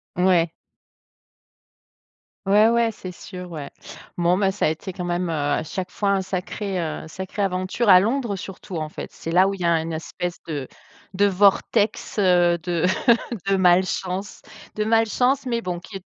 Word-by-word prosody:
Ouais. 180 -2 +3 2.0
Ouais, 210 +3 +6
ouais, 235 0 +3
c'est 185 -3 -8
sûr, 180 -1 -9
ouais. 145 -3 -6 0.5
Bon, 175 +1 +3
ben, 195 0 +2
ça 195 - -1
a - - +3
été 175 +4 -5
quand 180 - -5
même, 175 0 -1
heu, - - -1
à 145 0 0
chaque 180 +3 -5
fois 200 -1 -1
un 195 -1 +2
sacré, 185 +1 -3
heu, 160 0 -4
sacrée 190 +4 -4
aventure 185 +4 -1
à 185 -2 +9
Londres, 230 0 0
surtout, 185 -1 -7
en 155 -1 -3
fait. - - -8
C'est 165 - -8
là 185 +3 +5
où 195 - -1
il 195 - -8
y - - -2
a 170 - +4
un 165 0 0
espèce 170 +2 -5
de 145 -5 -4 0.5
de 200 +2 +3
vortex, 205 +3 +2
heu, 175 -3 +4
de 175 0 0 0.6
de 195 - +3
malchance. 185 +1 +1 0.3
De 215 - 0
malchance, 240 +5 +2
mais 235 -2 -1
bon, 180 -4 -3
qui 195 +2 -9
est 190 - -14
185 Hz, 180 wpm, -23 LUFS, 175-200 Hz, 2.0 s, à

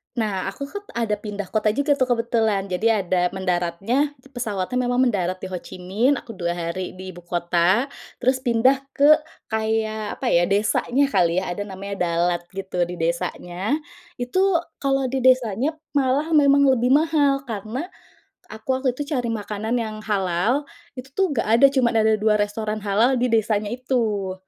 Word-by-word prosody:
Nah 210 -6 -1
aku 195 +8 -5
kan 405 0 -6
ada 230 -3 0
pindah 205 -2 -6
kota 215 -1 +1
juga 285 +1 +1
kebetulan 230 -5 +1
jadi 215 +2 +2
ada 180 0 +1
mendaratnya, 190 - 0 0.2
pesawatnya 220 -3 -3
memang 245 +1 +2
mendarat 185 -4 -1
di - - -5
Ho 185 - -2
Chi - - -10
Minh, 220 +10 +2
aku 230 - -9
2 175 -3 -2
hari 175 +2 -4
di 185 0 -7
ibu 175 - -11
kota, 175 +5 +1 0.4
terus 255 +1 +2
pindah 255 +2 +3 0.2
ke 290 +2 +7 0.4
kayak 220 -1 -1
apa 260 - -6
ya, 175 0 +4
desanya 215 +6 +2
kali 170 -4 +2
ya, 185 - -4
ada 205 - -5
namanya 200 +1 -6
Dalat 170 +1 +1
gitu, 190 -2 -3
di 180 - -6
desanya. 175 - -2 0.4
Itu 370 +10 +2 0.2
kalau 270 -1 +1
di 265 - 0
desanya 255 +2 +2 0.2
malah 285 +3 +1
memang 280 -2 +5
lebih 250 -1 +1
mahal, 290 -3 +3
karena 225 - -4 0.6
aku 215 0 -11
waktu 260 -1 +1
itu 290 - -2
cari 245 -4 -1
makanan 215 +1 -3
yang 220 -2 -3
halal, 205 +5 0 0.3
itu 255 +1 -8
tuh 385 +2 +1
gak 225 - 0
ada, 275 - +8
cuma 255 -3 +3
ada 220 -1 +3
2 210 0 +2
restoran 215 +1 -2
halal 225 +6 +2
di 250 - +3
desanya 215 -2 +1
itu. 225 -6 -1
220 Hz, 165 wpm, -23 LUFS, 190-255 Hz, 0.6 s, ada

